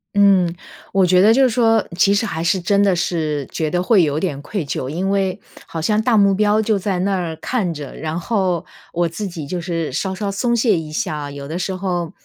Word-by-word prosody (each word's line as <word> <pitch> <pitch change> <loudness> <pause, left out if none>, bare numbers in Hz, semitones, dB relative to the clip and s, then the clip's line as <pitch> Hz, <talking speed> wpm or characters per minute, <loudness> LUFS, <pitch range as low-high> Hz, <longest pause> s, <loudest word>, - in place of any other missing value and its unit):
嗯， 195 -4 +4 0.4
我 195 0 +3
觉 180 +1 +4
得 215 +2 +6
就 265 - +3
是 260 - +5
说， 225 -2 +3
其 195 +2 +4
实 205 - +1
还 165 -7 -3
是 185 +2 +1
真 200 +3 +2
的 195 -2 +3
是 155 -5 -1
觉 155 -2 -2
得 175 - +1
会 190 0 +4
有 150 -1 0
点 160 -6 -2
愧 195 +3 -3
疚。 140 -2 -4
因 175 +7 -2
为 195 -2 0 0.3
好 165 - -5
像 210 +6 +1
大 235 0 +2
目 200 -2 +4
标 210 +1 +3
就 220 -1 +1
在 190 -1 -2
那 195 +2 +1
儿 170 -3 -3
看 185 0 -1
着， 145 -3 -8
然 160 +1 -4
后 185 -3 0 0.3
我 170 0 +1
自 200 +5 -4
己 165 -5 -7
就 180 +4 -3
是 170 -3 -3
稍 190 +8 -2
稍 200 +2 -3
松 235 +4 0
懈 225 -4 +3
一 155 -2 -5
下， 150 -2 -3
有 140 0 -8
的 160 +4 -4
时 185 +1 -2
候 180 -3 -3
185 Hz, 250 characters per minute, -19 LUFS, 165-200 Hz, 0.4 s, 得